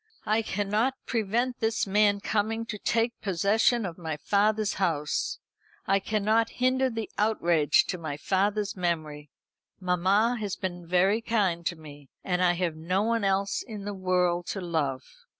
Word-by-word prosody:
"I 215 +1 +2
cannot 215 +5 0
prevent 235 +3 -1
this 225 0 0
man 205 0 +3
coming 220 +1 -1
to 210 -2 -6
take 230 +3 0
possession 210 +4 +2
of 175 -1 -6
my 160 -3 -4
father's 210 +5 +1
house. 155 -5 0 0.5
I 195 - +3
cannot 215 +3 +1
hinder 260 +1 +2
the 225 -3 -4
outrage 175 -8 +3
to 180 - -2
my 155 -3 -5
father's 200 +5 0
memory. 155 -5 -3 0.5
Mamma 195 +6 +2
has 205 -3 -3
been 175 -2 -5
very 190 +5 +3
kind 200 -7 0
to 175 - -1
me 145 -3 -13
and 180 -1 0
I 175 -1 +4
have 175 -2 -1
no 180 +5 -1
one 230 0 0
else 195 0 +1
in 210 -4 -8
the 205 - -3
world 180 -2 0
to 195 - -3
love." 160 -7 -2
195 Hz, 155 wpm, -27 LUFS, 175-220 Hz, 0.5 s, I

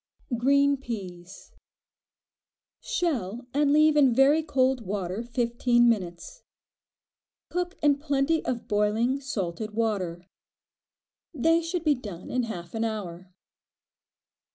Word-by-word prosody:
Green 280 +3 +3
Peas. 190 -7 -8 1.3
Shell 255 - -2
and 285 0 +2
leave 305 +1 +5
in 270 -5 +4
very 280 +4 +5
cold 265 -4 +1
water 195 0 -3
fifteen 240 0 +1
minutes. 220 - -2 1.1
Cook 355 +1 -3
in 285 -1 +4
plenty 290 +2 0
of 240 -2 -3
boiling, 215 +5 +1
salted 210 - -4
water. 190 -6 -2 1.1
They 325 +5 +3
should 335 +1 -3
be 305 -2 +4
done 205 -9 -8
in 250 -1 0
half 175 -5 -7
an 225 0 -1
hour. 185 -5 -5
240 Hz, 105 wpm, -26 LUFS, 205-285 Hz, 1.3 s, leave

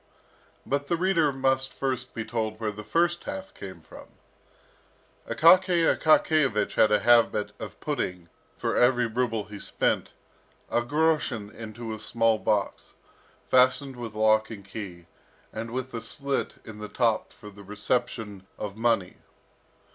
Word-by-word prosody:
But 140 +1 -1
the 170 - +1
reader 170 -4 +2
must 135 0 0
first 130 -2 -3
be 115 -2 -3
told 110 -1 -3
where 110 -2 -1
the 105 +1 -9
first 170 +10 +1
half 190 0 -6
came 95 -4 -9
from. 80 - -13 1.2
Akaky 175 +1 +5
Akakiyevich 150 -8 +3
had 110 - +4
a 105 - +3
habit 115 -3 +4
of - - -8
putting, 90 -2 -3 0.3
for - - -1
every 125 0 +4
ruble 115 -1 -1
he 105 -1 -10
spent, - - -1 0.6
a 120 - +2
groschen 145 -6 0
into 110 0 -7
a 110 - -7
small 115 +1 +1
box, 105 -2 -1 0.5
fastened 130 +1 +3
with 115 -3 -7
lock 110 0 +3
and 100 -4 -9
key, 95 -4 -8 0.5
and 115 +1 -5
with 130 +2 -4
a 115 - -4
slit 140 +4 -2
in 110 -1 -10
the 105 0 -6
top 115 0 +1
for 105 - -12
the 100 0 -14
reception 105 -1 -3
of 100 -2 -5
money. 110 -5 0
115 Hz, 145 wpm, -27 LUFS, 105-130 Hz, 1.2 s, Akaky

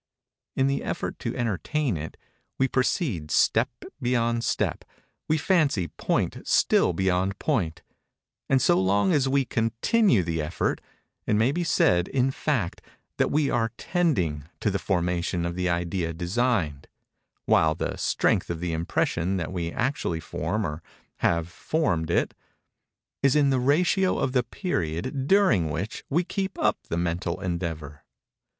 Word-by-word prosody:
In 135 - +2
the 140 0 0
effort - - -4
to - - -4
entertain 120 - -1
it, 80 0 -6 0.4
we 135 - +3
proceed 125 - 0
step - - +3 0.3
beyond 120 -1 +1
step—we 155 +6 -3
fancy 145 - +2
point - - -1
still - - +4
beyond 95 +2 0
point; 90 - -1 0.7
and 135 - +4
so 90 -7 +3
long 95 +1 +2
as 135 -2 +2
we 135 0 +2
continue 115 - +2
the 80 -1 -2
effort, 75 +3 -1 0.5
it 105 - +2
may 115 +5 +3
be 175 +4 -1
said, 90 - +3
in 135 0 +1
fact, 130 - -2 0.4
that - - +2
we 145 -2 +1
are 115 -1 0
tending 95 - 0
to 105 - 0
the 100 - -1
formation 90 -1 -1
of 85 - -2
the 90 0 0
idea 85 0 -1
designed; 90 - -1 0.6
while 80 -1 +4
the - - -3
strength - - +1
of 85 -1 -3
the 85 -1 -2
impression 85 +3 0
that 85 0 -4
we 85 -2 -2
actually 120 - -1
form 105 +5 -2
or 75 0 -4 0.4
have 85 -1 +1
formed 85 - -1
it, 85 - +1 0.9
is 140 0 +3
in 145 -2 +4
the 130 - +2
ratio 175 +8 +2
of 130 - 0
the 125 -1 +3
period 130 - -3
during 140 - +4
which 85 +8 -4
we 170 +6 +2
keep 190 +1 -3
up - - +1
the 85 - -1
mental 85 +1 -1
endeavor. 80 -6 -4
100 Hz, 145 wpm, -26 LUFS, 85-135 Hz, 0.9 s, still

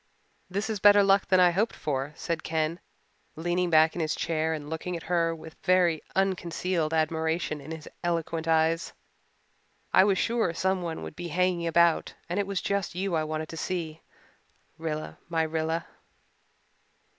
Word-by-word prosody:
"This 200 +4 -2
is 220 -2 -2
better 205 +1 +7
luck 195 0 +4
than 185 - +4
I 180 -1 +6
hoped 205 +6 0
for," 140 -1 -2
said 165 -1 -3
Ken, 160 +1 -1 0.6
leaning 175 +2 0
back 160 0 +5
in 175 - -3
his 155 -1 0
chair 160 -1 -1
and 150 -2 -4
looking 160 +3 -4
at 165 - -10
her 165 -1 +1
with 160 0 -11
very 180 -4 +3
unconcealed 180 -3 0
admiration 160 -1 0
in 140 - -11
his 160 -1 -7 0.2
eloquent 165 -1 -1
eyes. 160 +1 +2 1.0
"I 185 - +7
was 195 -2 +2
sure 225 -8 0
someone 180 -3 -1
would - - -8
be 175 +1 -5
hanging 175 0 +1
about 170 0 +3
and 175 +4 -1
it 200 - 0
was 200 -2 -2
just 200 -3 -1
you 190 0 -2
I 160 -1 +1
wanted 155 0 -4
to 165 - -7
see, 160 -3 -3 0.8
Rilla 155 -1 -4
my 165 -1 +1
Rilla." 160 +1 -1
165 Hz, 165 wpm, -28 LUFS, 160-185 Hz, 1.0 s, better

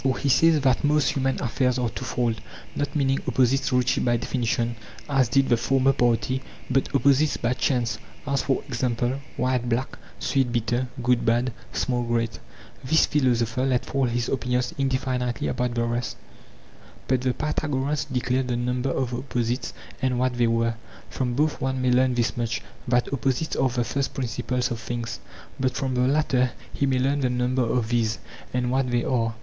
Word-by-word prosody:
For 130 -1 +1
he 140 - -1
says 160 +2 +5
that 130 -2 +2
most 150 0 +3
human 135 -1 0
affairs 125 +1 +1
are 125 -2 0
twofold, 120 -1 -2 0.3
not 145 +1 -2
meaning 135 -2 +2
opposites 130 +2 +2
reached 125 0 +2
by 120 -1 +2
definition, 120 -1 -1 0.3
as 135 -4 +2
did 135 +1 +3
the 120 - +3
former 135 +3 +3
party, 125 +2 +1 0.3
but 135 +1 +2
opposites 140 +2 +3
by 120 +1 0
chance—as, 130 +2 -1
for 135 - 0
example, 125 0 -1 0.2
white 125 -1 0
black, 120 +3 -2 0.2
sweet 135 -3 0
bitter, 120 +2 0 0.2
good 125 0 +3
bad, 120 +2 +1 0.2
small 125 -2 0
great. 115 -1 -1 0.4
This 160 +5 +4
philosopher 125 -3 +1
let 130 -2 +1
fall 135 -1 0
his 120 0 -1
opinions 125 -1 -1
indefinitely 130 -3 -1
about 125 -1 -1
the 120 - +1
rest, 120 +1 -2 0.9
but 130 -1 +2
the 130 -1 0
Pythagoreans 150 -1 -1
declared 130 -1 -1
the 120 -1 -1
number 125 +2 -1
of 130 -2 -1
the 120 - -2
opposites 125 -1 -2 0.3
and 130 -2 +1
what 130 0 +1
they 120 -1 +2
were. 115 0 +1 0.4
From 125 -2 -1
both 150 +3 +1
one 130 0 -1
may 130 -1 +2
learn 130 0 +3
this 120 -1 0
much, 115 -1 -2 0.2
that 120 +2 +1
opposites 135 +4 0
are 135 - +2
the 120 0 0
first 135 +2 -2
principles 125 0 -1
of 115 - -3
things; 115 +1 -4 0.4
but 130 -1 0
from 135 -1 -1
the 125 0 +2
latter 130 -3 +2 0.2
he 140 - 0
may 130 -1 +2
learn 135 +3 +1
the 130 -2 +1
number 125 +1 0
of 115 -1 0
these, 115 -2 +1 0.3
and 125 0 0
what 130 0 +1
they 120 -1 +1
are. 115 -3 0
125 Hz, 175 wpm, -25 LUFS, 120-135 Hz, 0.9 s, says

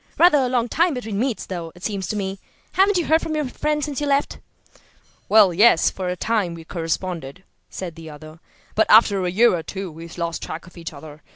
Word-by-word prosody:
"Rather 340 -4 +6
a 255 -2 +1
long 245 -2 +1
time 335 +4 +1
between 220 -5 -4
meets, 250 -1 -1
though, 170 -3 -6
it 180 - -16
seems 200 -4 -3
to 215 - -3
me. 195 -1 -3 0.3
Haven't 390 +1 +3
you 345 - 0
heard 320 +1 +3
from 315 - -3
your 300 -1 -1
friend 300 +3 -1
since 295 -1 -4
you 290 - -1
left?" 280 0 0 0.9
"Well, 205 -4 +6
yes, 200 -1 +5
for 185 -1 -4
a 180 - -2
time 195 -3 -1
we 165 - -10
corresponded," 165 -1 -4 0.3
said 180 -3 -6
the 165 -1 -11
other. 155 +2 -12 0.3
"But 220 0 +2
after 205 -3 +6
a 180 - 0
year 215 +3 +4
or 170 - -3
two 190 +2 -6
we 165 +2 -10
lost 170 -1 -3
track 160 - -6
of 180 - -17
each 170 -2 -7
other. 150 0 -12
195 Hz, 220 wpm, -22 LUFS, 170-250 Hz, 0.9 s, Rather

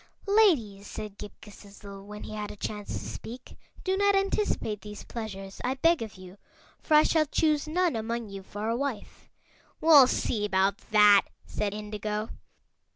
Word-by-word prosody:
"Ladies," 295 - +3
said 210 -2 -8
Ghip 210 - -7
Ghisizzle, 200 -1 -12
when 210 +1 -9
he - - -8
had 210 -1 -4
a - - -8
chance 205 0 -5
to - - -5
speak, 245 +2 -9 0.3
"do 380 0 0
not 405 0 +3
anticipate 390 - 0
these 210 -1 -9
pleasures, 195 -4 -7
I 255 +2 0
beg 330 +3 +3
of 220 -1 -6
you, 185 +1 -13 0.4
for 310 - +2
I 300 - +8
shall 310 -2 +2
choose 305 0 +1
none 345 -2 +1
among 225 0 -3
you 195 0 -7
for 205 +3 -6
a 230 - 0
wife." 260 -4 -5 0.5
"We'll 300 -5 +8
see 215 -4 -1
about 195 0 +1
that," 210 -2 +6 0.2
said 205 -1 -3
Indigo. 210 +1 -4
215 Hz, 165 wpm, -28 LUFS, 205-295 Hz, 0.5 s, I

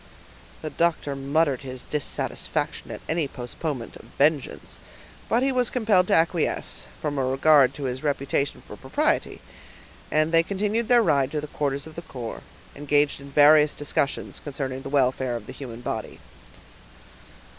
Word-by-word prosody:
The 155 - -4
doctor 165 -4 0
muttered 140 0 +1
his 130 -2 -8
dissatisfaction 150 -2 -3
at - - -7
any 160 -2 0
postponement 130 0 -5
of - - -15
vengeance, 145 -1 0 0.5
but 235 +3 +3
he 270 - +2
was 250 -2 +2
compelled 215 -7 +3
to - - +4
acquiesce, 165 0 0
from 145 -2 -2
a - - +1
regard 135 0 +5
to 145 - -6
his 130 0 -3
reputation 140 -1 -1
for - - -9
propriety; - - -1 0.7
and 155 +1 +2
they 165 0 +6
continued 210 +5 -1
their 240 -2 +5
ride 140 -7 +2
to 150 - 0
the - - -5
quarters 140 -2 -2
of 160 - -10
the 170 - -7
corps, 125 -8 -7 0.3
engaged 145 0 +1
in 140 - -10
various 150 +1 +6
discussions 145 -1 -2
concerning 135 -2 -4
the 135 - -7
welfare 130 -2 +1
of 115 -3 -6
the - - -8
human 120 -4 -8
body. - - -5
145 Hz, 155 wpm, -25 LUFS, 135-160 Hz, 0.7 s, they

